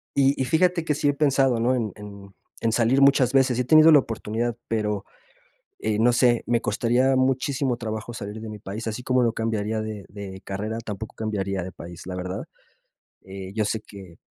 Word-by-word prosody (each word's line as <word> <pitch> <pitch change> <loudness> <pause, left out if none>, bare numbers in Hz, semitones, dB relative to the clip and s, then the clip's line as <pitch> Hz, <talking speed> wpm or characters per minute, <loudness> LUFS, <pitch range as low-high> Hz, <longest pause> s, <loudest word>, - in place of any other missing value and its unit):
Y 140 0 +3
y - - +2
fíjate 170 +5 +2
que 150 - 0
sí 145 0 +1
he 145 - +2
pensado, 135 -4 +2
¿no?, 125 +3 +2
en 110 -5 -2
en 100 -1 -11 0.3
en 115 - 0
salir 120 +4 +3
muchas 135 -2 +5
veces, 135 -2 +3
y - - 0
he - - +1
tenido 155 +4 +7
la 145 - +8
oportunidad, 115 0 -3
pero, 105 -3 -1 0.8
eh, 110 -1 -1
no 120 +3 +4
sé, 120 -1 +3
me 120 -1 +2
costaría 120 +5 +1
muchísimo 130 0 +1
trabajo 110 0 -5
salir 110 -1 -7
de 110 - -7
mi 105 - -8
país, 105 +3 -6
así 110 +2 -4
como 125 0 +2
no 115 - +2
cambiaría 110 -1 -1
de 110 -2 -6
de 95 -2 -8
carrera, 105 +3 -4
tampoco 105 0 -6
cambiaría 100 -4 -2
de 95 - -7
país, 85 -1 -10
la 90 0 -5
verdad, 90 +1 -4 0.8
eh, 95 0 -8
yo 110 -1 +1
sé 105 +1 -2
que 95 -6 -13
115 Hz, 200 wpm, -24 LUFS, 105-130 Hz, 0.8 s, la